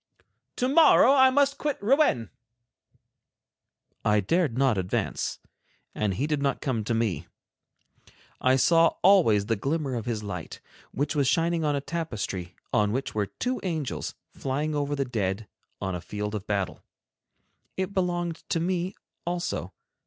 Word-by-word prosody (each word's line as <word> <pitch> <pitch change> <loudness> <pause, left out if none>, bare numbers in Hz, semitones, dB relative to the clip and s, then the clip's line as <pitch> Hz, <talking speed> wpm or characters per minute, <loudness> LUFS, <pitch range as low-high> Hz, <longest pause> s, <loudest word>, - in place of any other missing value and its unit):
"To 250 - 0
morrow 280 -2 +6
I 265 -1 +7
must 280 +1 +2
quit 295 -1 -1
Rouen." 215 - +2 1.7
I 105 0 +3
dared 135 - +1
not 135 -4 +3
advance, 95 -1 -2 0.6
and 105 -3 -1
he 130 - 0
did 150 -2 -1
not 140 -1 0
come 125 -6 -1
to 115 - 0
me. 110 -5 -1 1.1
I 130 +1 +4
saw 165 +5 +4
always 170 - +5
the 115 +1 +1
glimmer 140 +5 -2
of 115 -2 -4
his 110 -3 -2
light, 90 -5 -6 0.3
which 145 +4 -2
was 140 -3 +2
shining 165 +1 +2
on 150 -1 +1
a 140 - -1
tapestry 110 - -4 0.2
on 105 -1 +3
which 130 +4 -2
were 105 -2 0
two 250 - -3
angels 160 -8 -3 0.2
flying 145 +4 -2
over 145 0 -1
the 140 -1 -1
dead 105 -3 -2 0.3
on 95 0 -3
a 90 - -4
field 105 +3 -4
of 105 -1 -5
battle. 100 -3 -2 1.0
It 190 +1 -2
belonged 175 -3 -1
to 165 - +1
me 180 +2 -1 0.3
also. 175 0 -2
140 Hz, 150 wpm, -27 LUFS, 105-175 Hz, 1.7 s, I